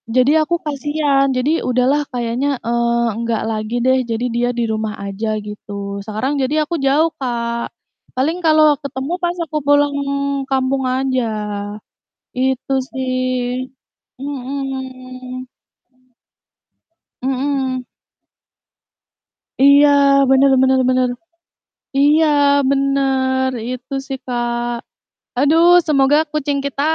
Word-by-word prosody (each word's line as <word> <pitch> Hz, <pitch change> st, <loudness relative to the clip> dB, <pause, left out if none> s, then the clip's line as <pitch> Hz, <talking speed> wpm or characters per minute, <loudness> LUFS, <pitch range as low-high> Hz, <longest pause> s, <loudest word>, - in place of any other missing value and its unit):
Jadi 255 Hz, +3 st, +4 dB
aku 345 Hz, +3 st, 0 dB
kasian, 290 Hz, -1 st, 0 dB
jadi 255 Hz, +5 st, +1 dB, 0.2 s
udahlah 255 Hz, +4 st, +2 dB
kayaknya, 245 Hz, +3 st, -2 dB, 0.2 s
eee, 235 Hz, 0 st, +1 dB
enggak 230 Hz, -2 st, -1 dB
lagi 215 Hz, +2 st, -3 dB
deh, 260 Hz, 0 st, +3 dB
jadi 230 Hz, +2 st, -1 dB
dia 245 Hz, +1 st, +1 dB
di -, -, +1 dB
rumah 215 Hz, -1 st, -2 dB
aja 200 Hz, +3 st, -4 dB, 0.2 s
gitu, 210 Hz, 0 st, -9 dB, 0.4 s
sekarang 260 Hz, +7 st, -2 dB
jadi 305 Hz, +4 st, +1 dB
aku 340 Hz, +3 st, -3 dB
jauh, 310 Hz, +4 st, +3 dB
Kak. 235 Hz, -2 st, -2 dB, 0.5 s
Paling 305 Hz, +7 st, 0 dB
kalau 310 Hz, -2 st, +5 dB
ketemu 270 Hz, +3 st, -5 dB
pas 345 Hz, 0 st, 0 dB
aku 310 Hz, -1 st, -4 dB
pulang 290 Hz, 0 st, +4 dB, 0.6 s
kampung 265 Hz, 0 st, 0 dB
aja, 260 Hz, -1 st, 0 dB, 1.2 s
itu 265 Hz, +1 st, 0 dB, 0.2 s
sih. 255 Hz, -1 st, -2 dB, 0.5 s
Mhm. 260 Hz, -2 st, -6 dB, 1.8 s
Mhm. 265 Hz, -1 st, -1 dB, 1.8 s
Iya, 280 Hz, +1 st, +7 dB, 0.4 s
bener 270 Hz, +1 st, +5 dB
bener 265 Hz, 0 st, +3 dB
bener. 255 Hz, 0 st, +2 dB, 0.9 s
Iya 300 Hz, +3 st, +4 dB, 0.4 s
bener, 270 Hz, -1 st, +1 dB, 0.2 s
itu 255 Hz, +2 st, -6 dB
sih, 270 Hz, -, -4 dB
Kak. 240 Hz, -1 st, -2 dB, 0.6 s
Aduh, 315 Hz, +5 st, +4 dB, 0.2 s
semoga 275 Hz, -1 st, +4 dB
kucing 290 Hz, -2 st, -1 dB
kita, 280 Hz, 0 st, -3 dB
265 Hz, 100 wpm, -18 LUFS, 250-280 Hz, 1.8 s, Iya